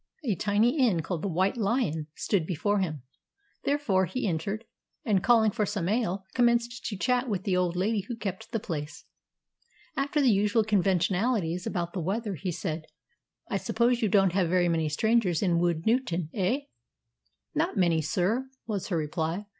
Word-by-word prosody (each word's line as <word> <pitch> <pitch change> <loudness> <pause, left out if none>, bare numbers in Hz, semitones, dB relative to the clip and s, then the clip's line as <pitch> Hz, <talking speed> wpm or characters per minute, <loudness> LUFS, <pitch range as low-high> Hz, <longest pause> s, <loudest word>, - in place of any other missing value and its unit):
A 235 -7 +1
tiny 210 - +2
inn, 210 - +3
called 170 -1 -3
the - - -2
"White 185 +5 +1
Lion," 200 - 0
stood 180 -7 0
before 205 +4 0
him, 155 -8 -2 0.6
therefore 210 -11 +2
he 255 +1 -2
entered, 195 +6 -2 0.4
and 200 -5 +2
calling 220 0 +5
for 210 - -1
some 200 -4 -2
ale, 200 -3 0
commenced 240 0 +2
to 205 - -4
chat 250 +4 +1
with 190 -4 -2
the 195 -4 +1
old 180 -1 +1
lady 200 +2 0
who 240 - -4
kept 195 -4 -5
the 225 - 0
place. 150 -5 -6 0.9
After 280 +2 0
the 265 -4 +5
usual 210 +2 +3
conventionalities 190 -1 +1
about 175 -3 -2
the 185 - -2
weather, 205 +5 -2
he 185 +1 -3
said, 160 -2 -4 0.6
"I - - -1
suppose 240 0 +1
you 215 - +2
don't 195 -2 +4
have 185 -3 +2
very 175 0 +3
many 160 -2 +1
strangers 205 0 +2
in 175 -3 +2
Woodnewton, 175 0 0
eh?" 210 +8 0 0.9
"Not 310 - 0
many, 170 -4 +3
sir," 210 - 0 0.2
was 205 -4 -3
her 175 - -1
reply. 160 +5 -2
195 Hz, 170 wpm, -28 LUFS, 175-230 Hz, 0.9 s, calling